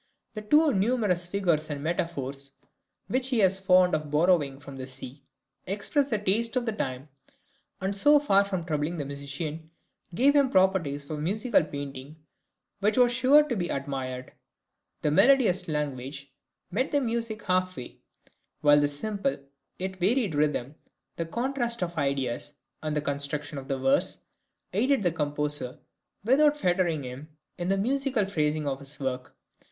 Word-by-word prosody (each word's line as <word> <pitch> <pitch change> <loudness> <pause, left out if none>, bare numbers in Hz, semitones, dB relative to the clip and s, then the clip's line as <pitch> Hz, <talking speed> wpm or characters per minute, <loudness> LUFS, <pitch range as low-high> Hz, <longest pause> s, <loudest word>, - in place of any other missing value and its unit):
The 215 - -5
too 295 +7 +4
numerous 195 -4 +1
figures 175 -5 0
and 145 -1 -4
metaphors 140 -5 -3 0.5
(which 255 0 0
he 245 -6 +2
was 190 0 +3
fond 185 -1 +4
of 155 -1 -1
borrowing 150 -3 +2
from 140 -1 -10
the 130 0 -6
sea) 130 +1 -7 0.5
express 215 +9 0
the 215 - +1
taste 215 +4 0
of 250 -1 0
the 225 - 0
time, 135 -8 -4 0.7
and 195 +1 -2
so 295 +9 +5
far 200 -9 +4
from 190 -3 -3
troubling 155 +1 -2
the 145 - -3
musician, 145 +3 -6 0.5
gave 280 +8 +4
him 280 -2 +5
opportunities 170 -7 +2
for 155 +1 -5
musical 205 +8 +1
painting 140 -1 -7 0.6
which 210 +5 +1
was 245 -1 +5
sure 260 +5 +5
to 245 - -1
be 175 -4 -2
admired. 130 -2 -4 0.7
The 150 - +2
melodious 240 - +4
language 140 -2 -4 0.4
met 255 +9 0
the 290 - +3
music 230 -3 -2
half 185 -1 0
way, 125 - -9 0.6
while 145 -1 +6
the 145 - +3
simple 205 - -2 0.4
yet 190 0 -4
varied 205 +1 +1
rhythm, 145 -3 0 0.4
the 165 - -3
contrast 240 +1 -1
of 170 -1 -4
ideas, 140 0 -2 0.3
and 155 -1 -2
the 150 - +1
construction 145 0 -2
of 135 - -11
the 135 - -1
verse, 135 +1 +2 0.6
aided 255 +4 +2
the 175 - +2
composer, 150 -4 -1 0.5
without 290 +6 +4
fettering 175 - +1
him, 130 +5 -8 0.3
in 175 - -2
the 195 - +2
musical 260 0 0
phrasing 155 -5 -1
of 135 -1 -2
his 140 +1 -5
work. 130 -2 -4
175 Hz, 155 wpm, -27 LUFS, 145-215 Hz, 0.7 s, while